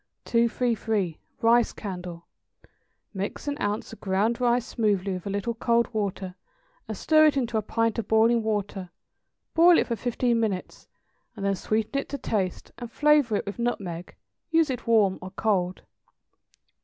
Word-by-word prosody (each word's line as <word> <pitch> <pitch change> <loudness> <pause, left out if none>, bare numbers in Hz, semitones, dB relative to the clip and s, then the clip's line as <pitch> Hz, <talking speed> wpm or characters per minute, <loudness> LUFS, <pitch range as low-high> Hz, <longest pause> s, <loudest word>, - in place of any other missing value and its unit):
233. 230 -6 0 0.2
=Rice 235 +1 +4
Candle.= 180 -4 -7 0.9
Mix 200 +8 -5
an 285 - -1
ounce 205 +2 -2
of - - -12
ground 210 +5 0
rice 240 0 +2
smoothly 200 -6 0
with 180 +1 -6
a - - -2
little 205 +4 -2
cold 235 +1 +1
water, 195 -3 -3 0.5
and - - -5
stir 310 -1 +5
it 290 - +2
into 240 -3 -1
a 220 - +2
pint 230 +2 0
of 215 - -4
boiling 225 +1 +4
water; 205 -4 -3 0.6
boil 340 +1 +7
it - - +3
for 235 - -2
fifteen 240 +1 0
minutes, 205 -5 -3 0.5
and 200 - -5
then 200 - +2
sweeten 215 +7 -1
it - - -14
to 285 - -3
taste 205 -8 -2
and 240 -2 -7
flavor 295 -6 +3
it - - -1
with 200 +3 -6
nutmeg. 180 -8 -3 0.3
Use 325 -3 +3
it 250 -1 -6
warm 210 -5 +3
or 185 - -7
cold. 185 -2 -1
220 Hz, 160 wpm, -26 LUFS, 195-240 Hz, 0.9 s, boil